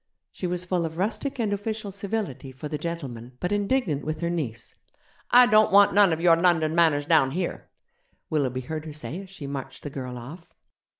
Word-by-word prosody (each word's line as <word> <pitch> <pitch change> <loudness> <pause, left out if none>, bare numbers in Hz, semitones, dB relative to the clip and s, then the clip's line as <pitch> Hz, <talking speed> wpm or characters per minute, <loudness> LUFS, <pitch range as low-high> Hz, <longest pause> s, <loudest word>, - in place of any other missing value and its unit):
She 180 - -4
was 180 0 -2
full 180 -1 0
of 160 0 -4
rustic 225 +9 -2
and 220 -4 0
official 210 0 -4
civility 195 - -4
for 130 +4 -7
'the 150 0 -4
gentleman', 130 -8 -6
but 180 - -2
indignant 205 - 0
with 155 +2 -4
her 170 0 0
niece. 120 -10 -4 0.6
'I 250 +1 +8
don't 215 -3 +4
want 200 +1 +6
none 200 -3 +6
of 160 - 0
your 170 -1 +5
London 165 -3 +2
manners 160 -4 +3
down 155 -4 +4
here,' 175 +5 -4 0.6
Willoughby 130 -5 -1
heard 155 +4 -5
her 155 - -7
say 150 +4 -5
as 195 - -12
she 185 -6 -8
marched 140 -1 -6
the 145 - -5
girl 125 -2 -6
off. 150 +9 -10
165 Hz, 195 wpm, -26 LUFS, 145-195 Hz, 0.6 s, I